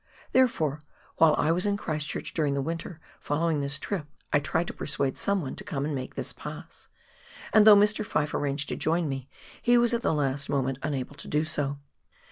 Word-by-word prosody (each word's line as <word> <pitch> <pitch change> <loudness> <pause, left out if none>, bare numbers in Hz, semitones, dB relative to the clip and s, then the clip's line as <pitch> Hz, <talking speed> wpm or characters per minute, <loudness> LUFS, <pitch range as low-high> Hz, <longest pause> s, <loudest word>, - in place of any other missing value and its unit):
Therefore, 155 - +2 0.4
while 160 -2 +6
I 155 - +2
was 180 +4 +2
in 200 0 +1
Christ 155 -6 -3
church - - -4
during 150 -4 +1
the 140 - 0
winter 165 +2 -5 0.2
following 160 +1 0
this 140 +1 -1
trip, 160 -1 -4 0.3
I 145 - +5
tried 160 +4 0
to - - -6
persuade 140 -2 -1
someone 190 -9 -1
to - - -5
come 150 -9 -3
and 150 - -2
make 130 -2 -5
this - - -2
pass, - - -9 0.7
and 215 -1 +7
though 210 - +11
Mr. 210 +1 +3
Fyfe 150 -8 -1
arranged 140 0 -1
to - - -2
join 165 +1 +1
me, 135 -1 -5 0.3
he 240 0 +4
was 240 0 +4
at 235 - +1
the - - +1
last 145 -2 0
moment 135 -1 0
unable 140 -2 -3
to - - -8
do 150 +1 +1
so. 145 -3 -1
155 Hz, 205 wpm, -27 LUFS, 140-180 Hz, 0.7 s, though